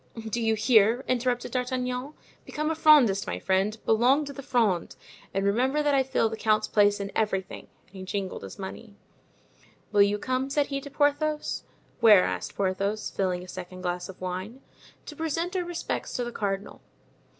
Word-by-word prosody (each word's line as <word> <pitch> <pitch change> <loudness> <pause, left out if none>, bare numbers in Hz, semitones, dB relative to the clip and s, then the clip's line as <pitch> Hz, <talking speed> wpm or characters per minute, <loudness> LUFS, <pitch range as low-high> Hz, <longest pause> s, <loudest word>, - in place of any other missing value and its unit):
"Do 235 +2 -2
you 225 -1 +2
hear?" 220 +2 +4
interrupted 245 -1 0
D'Artagnan; 250 +2 -2 0.3
"become 305 +1 -2
a - - +1
Frondist, 290 -11 +5
my - - -2
friend, 195 +3 0
belong 255 +7 +3
to 280 - -7
the 275 - -8
Fronde, 220 -10 0 0.4
and 195 0 -1
remember 260 +9 +1
that 290 -1 +2
I 275 - +4
fill 265 -3 +1
the 220 - -4
count's 215 -1 +1
place 205 -1 +3
in 200 0 -4
everything;" 195 -3 -2 0.2
and 185 - -22
he 190 - -8
jingled 190 0 -4
his 95 - -9
money. 200 +2 -8 1.0
"Will 205 -1 +4
you 200 +1 +4
come?" 255 +4 -2
said 285 +1 +1
he 275 -1 -4
to 285 - -9
Porthos. 295 +2 0 0.3
"Where?" 210 -5 +7
asked - - -3
Porthos, 200 +2 -1
filling 180 -2 -1
a - - -11
second 185 0 -8
glass 180 0 -3
of 190 - -10
wine. 185 +7 -5 0.4
"To 300 - -9
present 330 +4 -2
our 365 - 0
respects 345 -1 -4
to 245 - -1
the 240 - -4
cardinal." 200 -2 -4
225 Hz, 180 wpm, -27 LUFS, 195-270 Hz, 1.0 s, Where